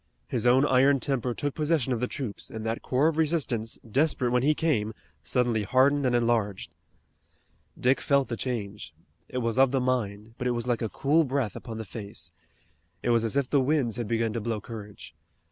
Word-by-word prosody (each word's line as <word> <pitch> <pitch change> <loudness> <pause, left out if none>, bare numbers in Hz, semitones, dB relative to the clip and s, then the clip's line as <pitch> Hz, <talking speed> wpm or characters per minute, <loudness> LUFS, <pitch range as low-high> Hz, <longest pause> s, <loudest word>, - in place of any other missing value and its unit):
His 125 -1 0
own 130 +3 +5
iron 135 0 +4
temper 125 -3 -1
took 145 -1 -2
possession 150 -4 +1
of 120 - -2
the 125 - 0
troops, 125 -7 -6
and 110 0 -6
that 115 +1 -2
core 135 +4 +2
of 160 -1 0
resistance, 145 -9 0
desperate 130 0 +1
when 125 0 +3
he 150 +4 +3
came, 110 -11 0 0.3
suddenly 120 - +1
hardened 130 +6 +3
and 120 - +2
enlarged. 110 -7 0 1.1
Dick 130 +2 +2
felt 140 -1 +2
the 120 - -3
change. 105 -9 -5 0.3
It - - -5
was 115 +2 0
of 135 -1 +6
the 135 +1 +1
mind, 115 -4 -2
but 125 - -1
it 120 - +1
was 120 - -3
like 120 -2 0
a 115 - -1
cool 150 +8 +2
breath 135 -6 -1
upon 115 -2 -7
the 110 - -5
face. 100 -6 -7 0.7
It 120 - +2
was 115 -1 +3
as 115 +4 0
if 140 -2 +1
the 140 0 +3
winds 130 -4 +1
had 120 -3 -3
begun 115 0 0
to 115 - -2
blow 115 0 -2
courage. 105 -1 -10
120 Hz, 200 wpm, -27 LUFS, 110-135 Hz, 1.1 s, of